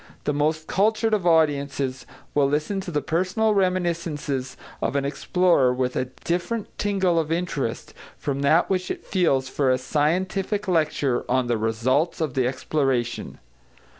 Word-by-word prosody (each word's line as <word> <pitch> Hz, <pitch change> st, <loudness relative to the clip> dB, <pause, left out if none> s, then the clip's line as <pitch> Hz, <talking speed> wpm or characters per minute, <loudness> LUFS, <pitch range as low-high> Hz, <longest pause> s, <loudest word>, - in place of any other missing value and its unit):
The 150 Hz, -, 0 dB
most 155 Hz, +2 st, 0 dB
cultured 220 Hz, +4 st, +1 dB
of 195 Hz, -5 st, +1 dB
audiences 140 Hz, -5 st, +1 dB, 0.3 s
will 145 Hz, -1 st, +3 dB
listen 155 Hz, +7 st, -1 dB
to 190 Hz, -, -7 dB
the 150 Hz, -4 st, -1 dB
personal 185 Hz, +6 st, +1 dB
reminiscences 170 Hz, -8 st, -1 dB, 0.2 s
of -, -, -1 dB
an 140 Hz, -1 st, +1 dB
explorer 160 Hz, -2 st, +2 dB
with 125 Hz, 0 st, -1 dB
a -, -, 0 dB, 0.2 s
different 180 Hz, +6 st, -2 dB
tingle 190 Hz, -4 st, +2 dB
of 160 Hz, -1 st, -2 dB
interest 165 Hz, -9 st, -2 dB, 0.2 s
from 140 Hz, -1 st, -3 dB
that 155 Hz, +4 st, +4 dB
which 185 Hz, -1 st, -1 dB
it -, -, -5 dB
feels 140 Hz, -9 st, +1 dB
for 135 Hz, 0 st, 0 dB
a 130 Hz, -, +3 dB
scientific 185 Hz, +9 st, -1 dB
lecture 150 Hz, -7 st, +1 dB
on 130 Hz, 0 st, +2 dB
the 120 Hz, -1 st, 0 dB
results 120 Hz, +9 st, 0 dB
of 155 Hz, -5 st, -1 dB
the 130 Hz, -1 st, +1 dB
exploration. 130 Hz, -3 st, -1 dB
155 Hz, 150 wpm, -24 LUFS, 135-180 Hz, 0.3 s, that